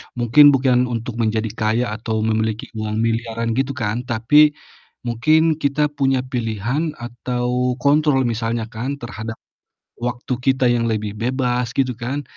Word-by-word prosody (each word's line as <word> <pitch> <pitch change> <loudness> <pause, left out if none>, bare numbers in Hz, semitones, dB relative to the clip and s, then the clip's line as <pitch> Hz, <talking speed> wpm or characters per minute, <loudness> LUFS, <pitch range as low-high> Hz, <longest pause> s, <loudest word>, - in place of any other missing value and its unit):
mungkin 120 +5 +6
bukan 125 -1 +2
untuk 115 0 -4
menjadi 110 -1 0
kaya 110 +1 +1
atau 110 0 -2
memiliki 110 0 -1
uang 110 0 -3
miliaran 115 0 -1
gitu 135 +3 -1
kan, 115 -1 -2
tapi 145 +6 +4 0.5
mungkin 155 +7 +2
kita 145 +1 +1
punya 135 -3 +1
pilihan 125 +5 -2
atau 125 +1 -2
kontrol 145 -2 +3
misalnya 115 -1 -1
kan 125 +6 -3
terhadap 110 -3 -7 0.6
waktu 120 +1 -3
kita 130 0 +1
yang 115 -1 +1
lebih 105 -2 -2
bebas 125 +1 -1
gitu 130 -2 +1
kan, 130 +5 -4
120 Hz, 135 wpm, -20 LUFS, 115-135 Hz, 0.6 s, mungkin